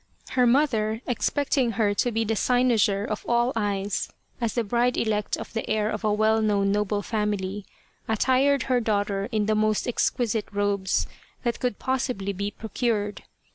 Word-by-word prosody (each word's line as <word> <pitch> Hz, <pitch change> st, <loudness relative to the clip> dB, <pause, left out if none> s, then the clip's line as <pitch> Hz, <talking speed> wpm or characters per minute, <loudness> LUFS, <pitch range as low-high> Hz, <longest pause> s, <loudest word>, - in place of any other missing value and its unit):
Her 250 Hz, -1 st, +3 dB
mother, 230 Hz, -5 st, +2 dB
expecting 260 Hz, 0 st, 0 dB
her 210 Hz, -1 st, +2 dB
to 245 Hz, +4 st, 0 dB
be 225 Hz, 0 st, 0 dB
the 225 Hz, 0 st, -1 dB
cynosure 225 Hz, -4 st, +2 dB
of 215 Hz, -2 st, -4 dB
all 240 Hz, +1 st, +2 dB
eyes 205 Hz, -2 st, -1 dB, 0.3 s
as 230 Hz, -2 st, -1 dB
the 235 Hz, -, +1 dB
bride 240 Hz, +3 st, +1 dB
elect 210 Hz, -2 st, 0 dB
of -, -, -8 dB
the 225 Hz, -, -3 dB
heir 215 Hz, 0 st, +1 dB
of -, -, -4 dB
a 215 Hz, -, +2 dB
well 215 Hz, +1 st, +3 dB
known 200 Hz, -2 st, +2 dB
noble 205 Hz, 0 st, 0 dB
family, 205 Hz, -2 st, -2 dB, 0.4 s
attired 260 Hz, +5 st, +2 dB
her 255 Hz, -2 st, +1 dB
daughter 205 Hz, -3 st, -1 dB
in 215 Hz, -2 st, +1 dB
the 215 Hz, -, +2 dB
most 215 Hz, 0 st, +1 dB
exquisite 235 Hz, -2 st, 0 dB
robes 200 Hz, -2 st, 0 dB, 0.4 s
that 235 Hz, -2 st, -1 dB
could 245 Hz, -5 st, -1 dB
possibly 250 Hz, -7 st, -2 dB
be 200 Hz, +2 st, -2 dB
procured. 210 Hz, -1 st, -2 dB
215 Hz, 165 wpm, -25 LUFS, 205-240 Hz, 0.4 s, Her